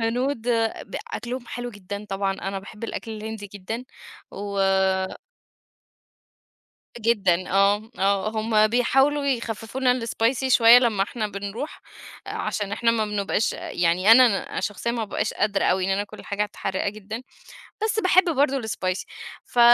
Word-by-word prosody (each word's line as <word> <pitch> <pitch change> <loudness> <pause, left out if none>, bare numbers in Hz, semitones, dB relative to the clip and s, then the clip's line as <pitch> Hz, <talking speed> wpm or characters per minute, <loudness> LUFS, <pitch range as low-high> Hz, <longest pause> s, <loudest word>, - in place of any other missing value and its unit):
هنود 245 +1 -1 0.4
ب - - -6 0.2
أكلهم 245 0 -5
حلو 245 0 -5
جدًا 205 0 -7
طبعًا، 195 -1 -1
أنا 195 0 -4
باحب 210 +3 -9
الأكل 225 - -5
الهندي 220 -1 -6
جدًا 205 +5 -6 0.5
و 200 0 -5 2.4
جدًا، 195 -6 +2
آه، 200 +3 +2
آه، 195 +1 +2
هُم 220 -1 +3
بيحاولوا 270 +5 +2
يخففوا 230 -2 -3
لنا 250 -1 +3
الSpicy 240 +4 0
شوية 235 -1 +8
لما 230 -6 +2
إحنا 215 +2 -2
بنروح؛ 200 +9 -5 0.5
عشان 205 -1 -3
إحنا 230 +2 +2
ما 225 -2 +1
بنبقاش 210 +1 0
يعني 180 +4 +1
أنا 235 -4 +4
شخصيًا 215 +3 -2
ما 230 -2 -2
بأبقاش 205 - -2
قادرة 205 -1 +1
أوي، 185 0 +2
بعني 190 +1 +1
أنا 200 - 0
آكل 205 - -11
حاجات 205 +1 -3
حراقة 190 +1 -1
جدًا، 215 +3 -7 0.6
بس 440 0 +1
باحب 370 -2 +5
برضو 275 -1 +2
الSpicy 185 -4 -2 0.4
ف 245 - -3
215 Hz, 140 wpm, -24 LUFS, 200-240 Hz, 2.4 s, شوية